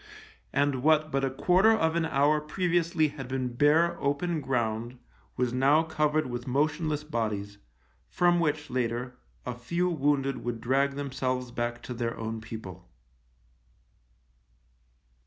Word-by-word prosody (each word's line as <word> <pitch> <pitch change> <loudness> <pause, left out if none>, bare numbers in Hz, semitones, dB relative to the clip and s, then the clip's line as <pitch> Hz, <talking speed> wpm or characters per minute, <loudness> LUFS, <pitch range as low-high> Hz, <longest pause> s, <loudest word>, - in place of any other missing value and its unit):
And 140 -2 +1
what 155 +1 +3
but 135 0 0
a 135 - +2
quarter 180 +10 +4
of 165 -7 +2
an 170 -1 +1
hour 150 +1 +2
previously 165 -1 +1
had 135 -3 -8
been 130 -1 -2
bare, 160 +6 +3
open 155 +4 0
ground 120 -2 -2 0.4
was 125 -1 0
now 140 +5 +4
covered 155 -1 0
with 120 0 -5
motionless 150 +3 0
bodies, 105 -7 -3 0.5
from 175 0 +3
which, 155 -1 -1
later, 125 0 -2 0.3
a - - -3
few 170 +9 -1
wounded 140 -3 0
would 120 -1 -3
drag 135 +4 +1
themselves 130 -3 -2
back 120 0 -3
to 125 - -5
their 120 -1 -3
own 115 0 -4
people. 105 -5 -9
140 Hz, 135 wpm, -28 LUFS, 120-155 Hz, 0.5 s, quarter